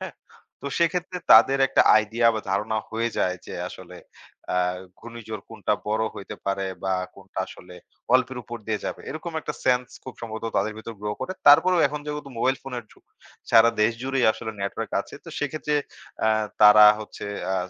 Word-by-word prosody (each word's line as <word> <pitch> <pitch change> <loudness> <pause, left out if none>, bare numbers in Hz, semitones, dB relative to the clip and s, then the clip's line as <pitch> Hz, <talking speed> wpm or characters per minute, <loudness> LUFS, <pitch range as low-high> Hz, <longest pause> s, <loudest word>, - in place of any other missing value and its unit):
হ্যাঁ? - - -7 0.5
তো - - -5
সেক্ষেত্রে 180 +2 0
তাদের 135 +5 +7
একটা 135 - +4
আইডিয়া 115 +2 +2
বা, 110 - -2
ধারণা 105 +3 -1
হয়ে 115 +1 -1
যায় 90 0 +1
যে, - - -7 0.2
আসলে - - -11 0.6
আ - - +3 0.4
ঘূর্ণিঝড় 115 -3 -8
কোনটা - - -1
বড় 110 +1 +1
হইতে 100 - -8
পারে 95 0 -1 0.2
বা, 95 - +1 0.2
কোনটা 95 0 -11
আসলে 90 0 -13 0.4
অল্পের 130 0 +2
উপর 120 +2 -7
দিয়ে 110 -1 -2
যাবে। - - -4
এরকম 160 +3 -6
একটা - - -5
সেন্স 125 -1 +2 0.2
খুব 130 - -8
সম্ভবত 110 -1 -6
তাদের 105 +2 0
ভিতর 115 +1 -8
grow 105 0 -3
করে। 185 - -3 0.2
তারপরেও 175 +4 +6
এখন 150 +1 -5
যেহেতু 150 -1 -5
মোবাইল 130 +3 +2
ফোনের 125 -4 -6
যুগ। - - -24 0.5
সারা 115 0 +7
দেশ 115 +2 +3
জুড়েই 135 -1 0
আসলে 110 - -6
নেটওয়ার্ক 100 0 -4
আছে। - - -14
তো - - -11
সেক্ষেত্রে 150 +1 -2 0.5
আ - - +4 0.3
তারা 105 0 +9 0.2
হচ্ছে 105 -1 -8 0.3
আ 95 - +1
115 Hz, 175 wpm, -24 LUFS, 105-135 Hz, 0.6 s, তারা